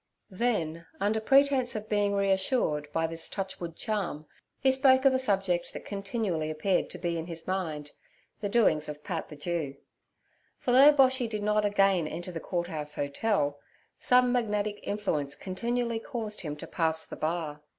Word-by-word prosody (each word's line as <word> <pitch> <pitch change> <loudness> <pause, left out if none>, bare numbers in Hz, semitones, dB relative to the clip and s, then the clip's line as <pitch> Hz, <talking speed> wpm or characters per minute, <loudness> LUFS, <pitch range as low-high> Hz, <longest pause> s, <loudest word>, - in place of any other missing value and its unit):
Then, 170 -7 -1
under 210 +3 +1
pretence 270 0 +3
of 215 0 -4
being 205 -1 +1
reassured 190 - +1
by 165 +1 0
this 165 0 -4
touch 190 -1 -4
wood 170 -2 -6
charm, 195 -9 -3 0.3
he 265 - +4
spoke 265 0 +4
of 270 - +6
a 260 - +2
subject 195 -7 0
that - - -8
continually 195 -6 -2
appeared 165 +5 0
to - - -6
be 170 -2 -2
in 165 - -6
his 165 -1 -4
mind—the 180 +3 -5
doings 160 -9 +3
of 150 0 -8
Pat 170 -5 -4
the 150 - -9
Jew; 150 -2 -3 0.8
for 250 - -2
though 270 +4 +9
Boshy 260 -4 +3
did 210 -2 -3
not 210 0 +2
again 195 -5 +3
enter 175 +4 -5
the 165 - -5
Court 175 +1 -2
House 150 -3 -5
Hotel, 145 0 0 0.4
some 250 0 +4
magnetic 210 -4 0
influence 150 -9 -2
continually 235 +6 -2
caused 220 -2 -4
him 150 -4 -4
to 150 - -8
pass 160 -2 0
the - - -8
bar. 155 -2 -3
195 Hz, 170 wpm, -29 LUFS, 160-225 Hz, 0.8 s, though